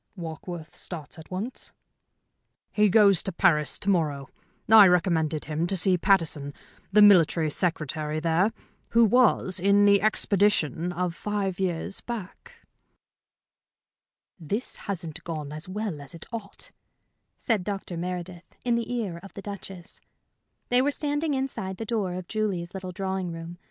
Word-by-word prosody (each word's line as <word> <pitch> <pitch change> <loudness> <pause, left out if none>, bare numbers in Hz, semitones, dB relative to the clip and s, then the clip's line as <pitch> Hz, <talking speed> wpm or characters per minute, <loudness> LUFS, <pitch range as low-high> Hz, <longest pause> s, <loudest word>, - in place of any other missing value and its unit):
"Warkworth 165 0 -7
starts 165 -2 -7
at 160 - -13
once?" 200 +8 -6 1.0
"He 210 -1 +3
goes 200 -3 +5
to 195 - -3
Paris 155 -3 +2
to - - -9
morrow. 150 -7 -1 0.4
I 220 -3 +9
recommended 165 -4 +1
him 155 +3 -1
to 195 - +1
see 185 +1 +4
Pattison, 165 -6 +1 0.4
the 210 +1 +7
Military 165 -5 +5
Secretary 155 -2 -1
there, 165 +5 +2 0.4
who 230 0 +5
was 215 -5 +3
in 200 +2 +4
the 200 -1 +5
expedition 195 -6 +2
of 180 0 -2
five 195 -1 -3
years 185 +1 -2
back." 240 - -8 1.7
"This 200 +10 -2
hasn't 175 -3 -4
gone 155 -4 -5
as 155 +4 -7
well 195 -6 -4
as 140 +4 -10
it 165 - -9
ought," 215 -3 -7 0.7
said 220 -6 0
Dr. 195 -2 -5
Meredith, 175 0 -6
in 240 - +2
the 235 +1 -1
ear 210 -9 -3
of 195 - -12
the 200 - -8
Duchess. 195 -2 -8 0.7
They 245 +1 +4
were 280 - +2
standing 290 +1 -1
inside 225 -8 -3
the 225 - -5
door 205 -5 -2
of 180 -1 -6
Julie's 195 -6 -2
little 185 -1 -6
drawing 190 -1 -3
room. 165 +1 -8
185 Hz, 145 wpm, -26 LUFS, 165-205 Hz, 1.7 s, I